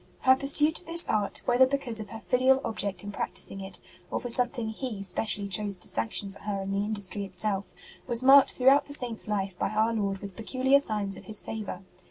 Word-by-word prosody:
Her 260 0 +4
pursuit 295 +3 +4
of 360 - -15
this 335 +1 +5
art, 210 -2 -1
whether 250 +1 +3
because 260 -4 -1
of 210 -1 -8
her 225 - -9
filial 260 +3 +2
object 200 -4 -4
in 205 - -7
prac - - -5
tising 195 - 0
it 190 0 -6 0.3
or - - -3
for 245 - -5
something 240 -2 +1
He 220 -3 -6
specially 205 0 +3
chose 200 0 -2
to 180 - -3
sanction 115 - -2
for 200 - -16
her 205 -2 -5
in 195 - -6
the 200 +1 -1
industry 205 -1 -3
itself, 200 0 -1 0.4
was 240 +1 +2
marked 275 +1 +6
throughout 265 +3 +3
the 285 - +1
Saint 240 -5 0
s - - +3
life 195 -3 -3
by - - -1
Our 220 +2 0
Lord 200 -3 -2
with 195 -1 -10
peculiar 260 +4 +1
signs 210 -7 +1
of - - -13
His 215 -2 0
favour. 205 -4 -7
215 Hz, 225 wpm, -26 LUFS, 200-255 Hz, 0.4 s, marked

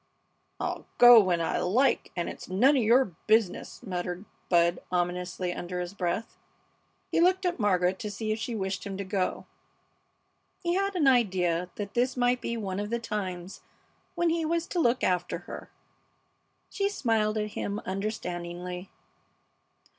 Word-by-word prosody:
"I'll - - -3
go 240 -1 +10
when 180 -4 +2
I 165 - 0
like, 245 +10 +2
and 175 -1 -2
it's - - -8
none 245 +11 +4
of 265 - +3
your 235 -2 +3
business!" 220 +1 +1
muttered 180 -1 -4 0.2
Bud, 170 0 +3
ominously, 180 0 -1
under 180 +1 -5
his 180 +1 -4
breath. 190 +4 -3 0.7
He - - +2
looked 370 +2 +3
at 350 -5 0
Margaret 185 -3 +2
to 210 - -4
see 215 +2 -3
if 215 - -1
she 230 +1 -3
wished 190 -1 -3
him 195 -2 -5
to 200 - -3
go. 190 -1 -2 1.2
He 345 0 +1
had 395 +1 0
an 330 -5 +2
idea 180 -8 +2
that 200 -1 -5
this 250 +2 +1
might 245 0 +2
be 235 - -3
one 195 -3 -3
of 205 0 -3
the 235 - 0
times 190 -5 -5 0.5
when 345 -1 +2
he 330 0 0
was 335 +1 0
to 355 - -1
look 245 -5 +2
after 180 -1 0
her. - - -8 1.0
She 400 -1 0
smiled 220 - 0
at 210 0 -1
him 205 0 -3
understandingly. 180 -2 -4
205 Hz, 160 wpm, -28 LUFS, 180-245 Hz, 1.2 s, go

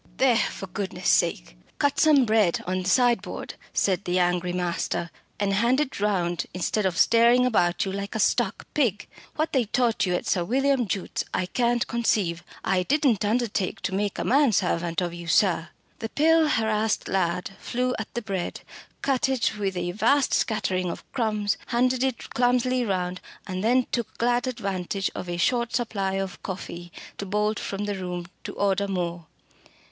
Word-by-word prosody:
"There, 260 -2 +4
for 225 - -1
goodness' 190 +1 -4
sake, - - +1 0.2
cut 285 0 +1
some 295 -4 +5
bread 215 -6 +2
on 185 +1 -1
the 185 - -2
sideboard," 245 0 +1 0.2
said 190 -1 +1
the 180 +1 0
angry 180 0 +1
master, 175 -1 -2 0.3
"and 200 -1 +1
hand 235 +6 +3
it 295 -7 -2
round 180 -4 0
instead 190 +3 0
of 175 -2 -3
staring 235 +2 +5
about 175 -8 +2
you 190 - -3
like 200 +1 -5
a - - -1
stuck 215 0 +1
pig. 230 -9 0 0.3
What 310 +1 -1
they 260 -4 +2
taught 225 -2 +1
you 180 - +1
at - - -3
Sir 180 - +1
William 265 +3 +1
Jute's 190 +1 -2
I 185 - 0
can't 240 +4 +1
conceive. 200 -7 0 0.2
I 190 -1 +2
didn't 260 -1 +2
undertake 215 -3 0
to - - -2
make 200 +1 -1
a - - -2
man 275 -1 +4
servant 170 -3 0
of 175 -1 -2
you, 170 0 -8
sir." 170 -1 +2 0.3
The 225 - -4
pale, 320 +3 +4
harassed 220 -3 0
lad 180 -1 -1
flew 250 +1 -1
at 220 - -5
the 240 - -2
bread, 195 -4 -3 0.4
cut 265 -1 +1
it 255 -4 +1
with 195 -2 -1
a 175 0 -1
vast 275 +8 +2
scattering 185 -5 0
of - - -6
crumbs, 215 -5 0
handed 255 +1 +1
it 260 -3 -2
clumsily 250 +1 +2
round, 185 -4 -2 0.2
and 185 -1 -4
then 245 +2 +3
took 235 -3 -3
glad 240 +1 +1
advantage 195 -5 -2
of 180 - -6
a 175 - -2
short 235 +6 +1
supply 205 -5 -1
of 195 -1 -4
coffee 175 -2 -7 0.3
to 200 - -3
bolt 210 +2 0
from 200 +1 -4
the 205 - -2
room 180 -2 -4 0.2
to - - -5
order 200 0 +1
more. 175 -3 -3
205 Hz, 175 wpm, -25 LUFS, 180-240 Hz, 0.4 s, some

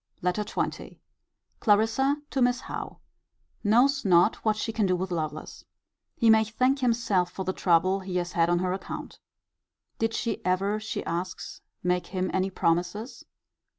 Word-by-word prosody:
LETTER 180 +4 0
XX. 210 - -4 0.6
Clarissa 225 +7 +3
to 270 - -1
Miss 245 +1 +2
Howe. - - -6 0.7
Knows 250 +6 +3
not 180 +1 +4
what 215 -1 0
she 225 +1 -3
can 215 -3 +1
do 185 - +2
with 185 +1 -3
Lovelace. 155 -2 -4 0.5
He 230 - +1
may 220 0 +6
thank 255 +5 +1
himself 230 -8 +1
for 190 - -5
the 185 - -1
trouble 185 +2 +2
he 190 -1 -6
has 175 0 -1
had 170 0 +2
on 175 - +3
her 180 +1 0
account. 190 - -7 0.8
Did 225 0 0
she 225 -1 -2
ever, 195 +3 +1
she 215 - -5
asks, 175 +2 -4 0.2
make 180 0 0
him 185 -1 -2
any 190 +1 +1
promises? 180 +6 -1
195 Hz, 155 wpm, -27 LUFS, 180-225 Hz, 0.8 s, may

